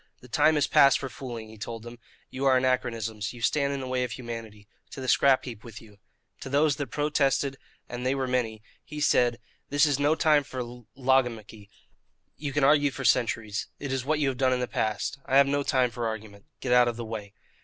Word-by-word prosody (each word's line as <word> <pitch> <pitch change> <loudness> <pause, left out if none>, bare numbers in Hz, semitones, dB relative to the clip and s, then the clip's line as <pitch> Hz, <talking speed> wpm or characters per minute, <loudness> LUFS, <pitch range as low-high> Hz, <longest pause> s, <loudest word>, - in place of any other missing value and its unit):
"The - - -14
time 155 0 +3
is 145 - +3
past 140 - +5
for 135 - -5
fooling," 120 -4 -8
he 110 -1 -13
told 115 +1 -6
them. 120 0 -10 0.3
"You 135 +1 -3
are 130 -1 +5
anachronisms. 115 -4 -1
You 120 - -11
stand 140 +1 +1
in 140 -1 -3
the 130 - -5
way 130 0 0
of 120 -3 -4
humanity. 115 -4 -8 0.3
To - - -7
the 130 - -5
scrap 135 +1 +4
heap 115 -4 -8
with 115 -3 -10
you." 105 -3 -18 0.4
To - - -7
those 145 +1 +2
that 145 -2 -3
protested, 140 -2 0 0.3
and 120 0 -6
they 130 +1 +1
were 135 -1 -2
many, 115 -4 -1 0.2
he 150 -1 -8
said: 125 -5 +3 0.3
"This 145 +2 +4
is 145 -2 +1
no 145 +2 +3
time 155 -2 +4
for 130 -3 -5 0.3
logomachy. 120 -6 0 0.7
You 145 -2 -5
can 145 0 0
argue 145 +1 +5
for 135 0 -6
centuries. 110 -3 +1
It 140 -2 -5
is 130 -1 -1
what 155 +3 0
you 145 -2 +1
have 130 - -4
done 130 -1 +2
in 125 - 0
the 125 - -1
past. 110 +4 -2
I 135 - +3
have 140 - +7
no 145 +1 0
time 130 -3 +1
for 115 0 -3
argument. 105 -2 -7 0.2
Get 125 - 0
out 125 -1 +6
of 120 - -1
the 120 0 -6
way." 105 -3 -7
130 Hz, 225 wpm, -27 LUFS, 115-140 Hz, 0.7 s, have